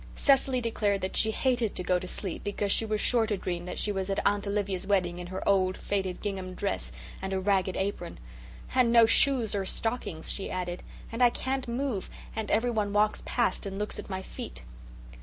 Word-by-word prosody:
Cecily 265 -2 +3
declared 210 -4 0
that 185 - -3
she 220 - +3
hated 240 -1 +1
to 180 - -2
go 180 0 +2
to 185 - -6
sleep 185 -1 -3
because 205 0 -1
she 225 - +3
was 215 0 0
sure 230 -1 +3
to 210 -2 0
dream 175 -2 -3
that 180 - -5
she 210 - -1
was 190 -1 -2
at 195 - 0
Aunt 205 0 +2
Olivia's 200 -2 -1
wedding 180 -3 +1
in 175 - -6
her 185 +1 -5
old 185 -2 +3
faded 190 -3 -2
gingham 190 -3 -4
dress - - -2 0.3
and 190 0 -3
a 190 - +1
ragged 190 -1 +1
apron. 190 -3 -3 0.6
"And 250 -2 +4
no 230 -1 +8
shoes 235 -1 +5
or 200 -1 0
stockings," 200 -5 -2
she 195 - -4
added, 180 -1 -3 0.3
"and 230 +2 -4
I 245 - +8
can't 260 +2 -2
move, 235 -4 -2 0.3
and 220 -1 -3
everyone 215 -3 +1
walks 210 +1 +2
past 240 -3 0
and 195 0 -5
looks 210 +1 -3
at - - -8
my 190 -1 -4
feet." - - -8
200 Hz, 205 wpm, -29 LUFS, 185-225 Hz, 0.6 s, no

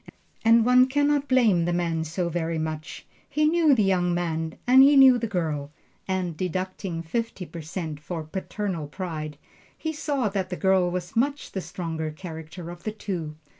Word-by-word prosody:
And 225 0 +5
one 250 +1 +6
can 290 +2 +2
not 290 -1 +1
blame 225 -10 +4
the 175 - 0
man 170 -2 0
so 170 +3 -2
very 165 -1 -2
much 155 +1 -5 0.2
he 300 +2 +1
knew 315 -2 +4
the 215 - +3
young 180 -2 +2
man 165 -2 -2
and 255 +2 +7
he 280 +2 +7
knew 260 -2 +8
the 230 - -2
girl; 155 -8 -2 0.4
and 185 -3 -1
deducting 185 0 -3
fifty 225 +2 -3
per 170 -1 -8
cent 160 -1 -5
for 160 +1 -5
paternal 185 0 -4
pride, 155 -3 -5 0.4
he 315 0 -3
saw 290 -6 -1
that 195 -2 -2
the 180 - -3
girl 190 -2 +3
was 175 +3 -5
much 280 +5 0
the 190 - -3
stronger 160 -3 -4
character 165 +1 -8
of 175 0 -11
the 215 - -3
two. 180 -8 -5
180 Hz, 180 wpm, -25 LUFS, 165-230 Hz, 0.4 s, knew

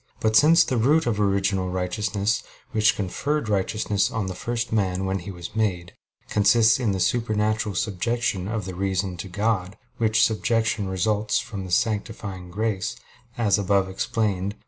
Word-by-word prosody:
But 110 0 +1
since 165 +6 +7
the 130 - -1
root 145 +7 +3
of 105 -3 0
original 95 -2 +1
righteousness, 100 +4 -1 0.3
which 110 -2 +3
conferred 140 +8 -2
righteousness 105 0 0
on 110 -3 -2
the 95 - -4
first 115 +4 -3
man 95 -3 0
when 95 0 -1
he 90 - -9
was 85 0 -8
made, 90 -6 -1 0.3
consists 110 +3 +4
in 115 -5 +1
the 95 - -2
supernatural 110 -1 0
subjection 105 -1 -1
of 110 -2 -3
the 95 - -5
reason 95 0 -1
to 95 - -6
God, 100 0 -1 0.2
which 110 -1 +3
subjection 110 -1 0
results 105 +3 0
from 95 -3 -5
sanctifying 100 -2 -2
grace, 100 0 -2 0.4
as 110 -3 +2
above 100 -1 +2
explained 100 0 -1
(Q. - - -28
105 Hz, 155 wpm, -24 LUFS, 95-110 Hz, 0.4 s, since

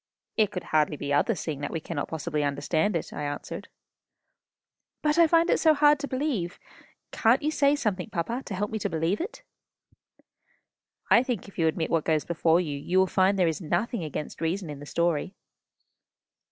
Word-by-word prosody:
"It 215 -3 +3
could 185 -3 -5
hardly 155 -1 +1
be 140 0 -2
other, 220 +10 +2
seeing 155 -5 -4
that 145 - -2
we 165 - -3
cannot - - -4
possibly 155 -1 -2
understand 145 +7 0
it," 165 - -3
I - - -5
answered. 145 0 -5 1.4
"But 300 +2 +2
I 335 - +7
find 330 +1 +4
it - - +3
so 315 -2 +5
hard 295 0 +5
to 285 - -4
believe. 255 - -2 0.5
Can't 240 +4 +3
you 305 - +1
say 285 -2 +3
something, 210 -8 -2
papa, 215 +6 -2
to 195 - -4
help 205 +2 -2
me 220 - -2
to 205 - -2
believe 165 - 0
it?" 465 +7 -6 1.7
"I 235 - +7
think 245 -7 -3
if 200 - -12
you 165 - +3
admit 160 0 -1
what 165 -2 +2
goes 155 -2 +1
before, 170 0 +2
you 155 +1 -2
will 190 - +6
find 190 +1 +2
there 180 -2 +3
is 160 +3 -2
nothing 205 +5 -1
against 150 -1 -6
reason 165 0 -2
in 145 - -8
the 145 - -10
story." 170 +3 0
180 Hz, 190 wpm, -27 LUFS, 160-235 Hz, 1.7 s, I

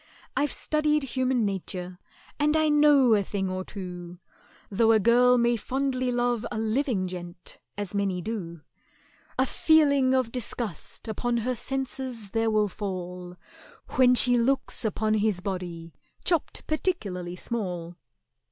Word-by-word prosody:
"I've 290 0 +1
studied 300 -1 +1
human 255 -3 0
nature, 185 -2 -4 0.4
and 300 +1 +3
I 315 -1 +3
know 295 -5 +5
a 205 - +4
thing 195 -1 -3
or 185 0 -3
two: 180 -3 -8 0.5
Though 225 +3 +4
a 220 - +5
girl 245 +4 +5
may 240 0 +3
fondly 255 +2 -1
love 240 -2 0
a - - -3
living 220 -3 0
gent, 175 -1 -8 0.2
as 205 -2 -4
many 200 -3 0
do— 175 -5 -5 0.8
A 260 - +3
feeling 280 -3 +4
of 255 -3 +1
disgust 235 -5 -4
upon 235 +2 -1
her 255 0 0
senses 260 -3 -3
there 225 0 +1
will 215 -1 +2
fall 180 -2 -6 0.5
When 250 -1 +5
she 245 0 +4
looks 265 +2 +1
upon 215 0 0
his 210 -3 +1
body 175 -3 -5 0.3
chopped 335 -4 0
particularly 200 - -2
small." 180 -5 -4
225 Hz, 135 wpm, -27 LUFS, 185-260 Hz, 0.8 s, know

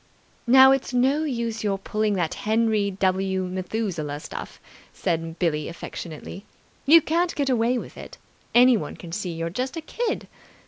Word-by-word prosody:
"Now, 265 +2 +8
it's 270 -2 0
no 270 +5 +2
use 235 -5 -3
your 200 -2 0
pulling 210 +2 -1
that 175 -4 -1
Henry 220 -1 +1
W. 190 0 0
Methuselah 180 -5 -3
stuff," - - -8 0.3
said 165 0 -3
Billie 155 -4 0
affectionately. 170 +2 -8 0.4
"You 325 +2 +8
can't 340 +2 0
get 280 -2 0
away 240 +1 +2
with - - -8
it. - - -10 0.4
Anyone 245 -2 +4
can 170 - -10
see 185 0 -3
you're 165 0 -4
just 255 - -3
a - - -3
kid. 460 +8 -3
215 Hz, 150 wpm, -24 LUFS, 180-255 Hz, 0.4 s, Now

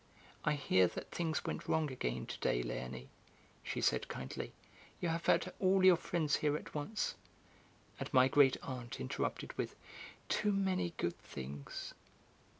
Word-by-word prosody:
"I 150 - +3
hear 95 -11 +4
that 90 - -7
things 165 -2 -1
went - - -3
wrong 155 -3 +2
again 60 - -2
to - - -6
day, - - +1
Léonie," 60 +1 -5 0.5
she - - -3
said - - +2
kindly, 65 0 -5 0.5
"you 175 - 0
have 165 +1 -2
had 175 +2 +3
all 190 0 +4
your 185 -1 +9
friends 160 -3 +1
here 150 0 +2
at - - -10
once." 155 +9 -1 0.9
And - - -4
my 130 -3 +7
great 135 -1 +5
aunt 125 -3 -5
interrupted 65 - -2
with: - - -2 0.5
"Too 210 -1 +2
many 185 -3 +1
good 85 - -1
things..." 70 +1 -7
145 Hz, 150 wpm, -36 LUFS, -, 0.9 s, your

